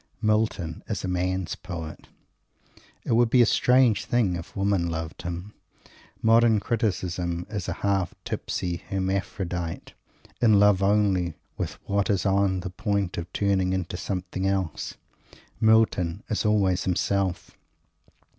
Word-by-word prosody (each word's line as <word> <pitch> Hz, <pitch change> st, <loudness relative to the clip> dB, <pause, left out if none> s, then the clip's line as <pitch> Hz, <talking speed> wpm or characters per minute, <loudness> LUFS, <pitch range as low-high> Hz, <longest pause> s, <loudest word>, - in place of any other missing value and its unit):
Milton 105 Hz, -7 st, 0 dB
is -, -, -2 dB
a -, -, -2 dB
man's 90 Hz, 0 st, -1 dB
poet. 80 Hz, -2 st, -7 dB, 1.0 s
It -, -, -3 dB
would 115 Hz, 0 st, +4 dB
be 125 Hz, +1 st, +6 dB
a -, -, +5 dB
strange 125 Hz, -2 st, +3 dB
thing 110 Hz, -7 st, +1 dB
if 85 Hz, -1 st, -8 dB
women 95 Hz, -3 st, +1 dB
loved 80 Hz, -1 st, -5 dB
him. 90 Hz, +4 st, -6 dB, 0.7 s
Modern 115 Hz, -1 st, +5 dB
criticism 90 Hz, -6 st, -1 dB
is 100 Hz, -4 st, -3 dB
a -, -, -1 dB
half 95 Hz, -3 st, +1 dB
tipsy 90 Hz, -1 st, -3 dB
Hermaphrodite, 95 Hz, -3 st, -3 dB, 0.5 s
in 110 Hz, -4 st, +5 dB
love 105 Hz, -2 st, +5 dB
only 95 Hz, -4 st, +2 dB, 0.2 s
with -, -, -3 dB
what 100 Hz, 0 st, +1 dB
is 100 Hz, -1 st, +1 dB
on 95 Hz, -1 st, +2 dB
the 90 Hz, 0 st, -5 dB
point 100 Hz, -2 st, -1 dB
of 85 Hz, +1 st, -7 dB
turning 95 Hz, -2 st, +1 dB
into 95 Hz, -2 st, -2 dB
something 95 Hz, +1 st, -3 dB
else. 95 Hz, -5 st, -2 dB, 0.6 s
Milton 110 Hz, -5 st, +3 dB
is 110 Hz, -, -1 dB
always 95 Hz, -3 st, +2 dB
himself. 95 Hz, 0 st, -1 dB
95 Hz, 130 wpm, -26 LUFS, 90-105 Hz, 1.0 s, be